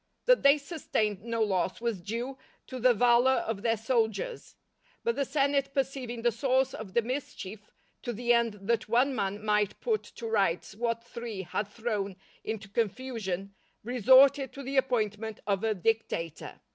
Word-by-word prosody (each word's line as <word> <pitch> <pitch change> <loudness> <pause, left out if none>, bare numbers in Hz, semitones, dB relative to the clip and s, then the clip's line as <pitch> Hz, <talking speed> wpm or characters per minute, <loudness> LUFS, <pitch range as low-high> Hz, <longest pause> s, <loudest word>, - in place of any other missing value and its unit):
That - - +5
they 280 +1 +6
sustained 225 - -2
no 230 -1 -1
loss 190 -3 0
was 230 -5 -2
due 240 +8 -4 0.3
to 255 - -7
the 250 +1 +5
valour 245 +3 +4
of 220 -3 -3
their 225 0 +1
soldiers 225 - -1 0.5
But 235 - +1
the 280 0 0
senate 275 0 +1
perceiving 255 -3 -2
the 240 - +4
source 260 +2 +1
of 205 -3 -8
the 235 - +4
mischief, 225 -5 -5 0.4
to 240 - -3
the 240 +1 +1
end 235 -2 +2
that 230 +1 0
one 250 +4 +3
man 205 -2 -2
might 210 -1 +1
put 445 -3 0
to 235 - -10
rights 195 -6 0
what 230 +2 -2
three 235 -4 -6
had 195 +3 -3
thrown 210 -3 -3 0.3
into 220 -1 -4
confusion, 205 -3 -3 0.3
resorted 260 +4 +5
to 280 - -8
the 270 +2 -4
appointment 220 -4 0
of 200 0 0
a 220 -1 +1
dictator. 180 -5 -2
230 Hz, 160 wpm, -29 LUFS, 210-260 Hz, 0.5 s, they